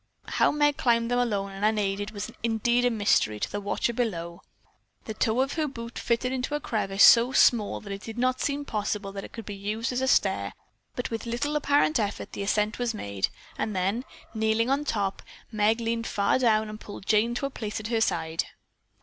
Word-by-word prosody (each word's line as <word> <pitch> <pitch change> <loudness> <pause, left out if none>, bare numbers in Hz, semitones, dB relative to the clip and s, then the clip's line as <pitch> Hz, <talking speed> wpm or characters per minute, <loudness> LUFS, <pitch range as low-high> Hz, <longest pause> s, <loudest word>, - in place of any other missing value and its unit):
How - - +3
Meg 290 -1 +2
climbed 235 -1 +2
them 245 - +2
alone 200 -5 0
and 195 +1 -7
unaided 205 -1 +1
was 205 -1 -6
indeed 235 +2 +1
a - - +5
mystery 205 - +2
to - - -2
the 205 - -3
watcher 205 +3 -1
below. 170 -8 -3 0.6
The 220 - -4
toe 220 +3 +1
of 270 +1 -1
her 310 -2 0
boot 235 -4 -7
fitted 240 +2 0
into 260 +3 -2
a - - -1
crevice 200 -7 +1
so 240 +2 +7
small 225 -6 +4
that 205 - -8
it 195 - -7
did 225 +1 -8
not 255 +1 +1
seem 285 0 -1
possible 210 -3 -2
that 195 0 -6
it - - -10
could 230 - -8
be 205 - -5
used 215 +5 -3
as 250 - -1
a 265 - +1
stair, - - +2 0.4
but 245 - -3
with 225 +1 -4
little 290 +6 -1
apparent 285 - +3
effort 205 -1 -3
the - - -5
ascent 210 +2 0
was 240 -2 -1
made, 100 - -2 0.3
and 215 - -2
then, 195 +6 0 0.3
kneeling 220 +2 +1
on 275 - +3
the 295 - -6
top, 200 -7 -1 0.3
Meg 215 +1 +2
leaned 230 0 -2
far 200 +5 +1
down 220 -3 +3
and 215 0 -8
pulled 205 -3 -10
Jane 220 +3 +2
to 275 - -2
a 275 - -3
place 215 -3 -4
at 220 +1 -6
her 230 -2 +1
side. 160 -6 0
225 Hz, 215 wpm, -27 LUFS, 205-245 Hz, 0.6 s, so